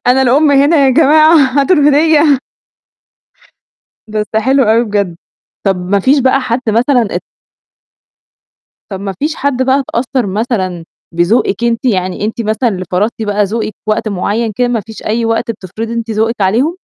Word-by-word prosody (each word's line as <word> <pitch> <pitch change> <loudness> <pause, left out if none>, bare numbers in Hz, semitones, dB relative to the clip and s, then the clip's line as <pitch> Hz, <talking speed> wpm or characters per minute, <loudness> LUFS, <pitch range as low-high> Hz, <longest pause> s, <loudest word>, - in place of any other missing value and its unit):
"أنا 255 +2 +4
الأم 280 +4 +3
هنا 285 +4 +3
يا - - +3
جماعة 310 +5 +5 0.3
هاتوا 345 +6 +2
الهدية." 295 -1 +3 1.7
بس 215 0 -2
حلو 265 +5 +2
أوي 225 +1 +3
بجد، 200 -5 -2 0.5
طب 195 -2 +1
ما 185 +3 -1
فيش 275 +8 +3
بقى 265 +1 +2
حد 250 0 -2
مثلًا 235 0 +1
ات - - -2 1.7
طب 190 - -5
ما 195 -1 -5
فيش 310 +2 -2
حد 270 -2 -1
بقى 265 +1 +2
اتأثّر 245 -1 -1
مثلًا 190 -5 -2 0.3
بذوقِك 190 +4 0
أنتِ، 235 +1 -1
يعني 185 -4 -1
أنتِ 225 +2 -3
مثلًا 220 +3 0
اللي 185 -3 -5
فرضتِ 210 +5 -1
بقى 205 -1 0
ذوقِك 215 +1 -3
في 215 - 0
وقت 215 - -1
معيّن 210 +4 -2
كده 245 0 +1
ما 235 -3 -1
فيش 220 0 -11
أي 230 +2 -1
وقت 225 0 -1
بتفرضي 225 +3 -7
أنتِ 230 -1 -4
ذوقِك 220 +1 -1
عليهم؟ 230 - +1
230 Hz, 165 wpm, -13 LUFS, 205-265 Hz, 1.7 s, جماعة